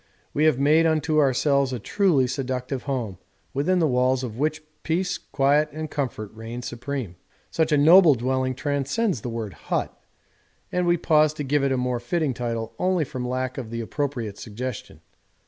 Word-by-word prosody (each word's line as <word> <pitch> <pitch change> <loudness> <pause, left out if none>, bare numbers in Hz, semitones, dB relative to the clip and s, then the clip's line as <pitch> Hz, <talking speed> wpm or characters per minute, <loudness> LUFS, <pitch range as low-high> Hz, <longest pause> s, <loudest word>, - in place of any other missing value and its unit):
We 150 - +2
have 155 -5 +4
made 155 +4 +4
unto 155 -1 +1
ourselves 140 0 +2
a 125 - -2
truly 150 - +2
seductive 130 0 -3
home, 115 -9 -3 0.3
within 160 +7 +1
the 170 - +3
walls 130 0 +2
of 115 -4 -5
which 155 +1 -1 0.2
peace, 180 +3 -1
quiet, 145 +2 +2
and 155 0 -5
comfort 120 -7 -3
reign 115 +2 -7
supreme. 120 -6 -5 0.3
Such 160 -1 +1
a 150 - +4
noble 160 +1 +7
dwelling 130 +1 -1
transcends 145 - -1
the 120 - -4
word 115 -4 -4
'hut,' - - -3 0.8
and 180 -1 0
we 175 0 +4
pause 155 -2 +3
to 150 - -4
give 145 +1 +1
it 140 - +1
a 130 - +1
more 125 -1 -1
fitting 145 +3 -1
title 115 -2 -3
only 185 -2 +2
from 130 -3 -5
lack 130 +1 -2
of 120 -4 -6
the 115 0 -4
appropriate 120 -4 -3
suggestion. 120 +1 -6
135 Hz, 175 wpm, -24 LUFS, 125-155 Hz, 0.8 s, noble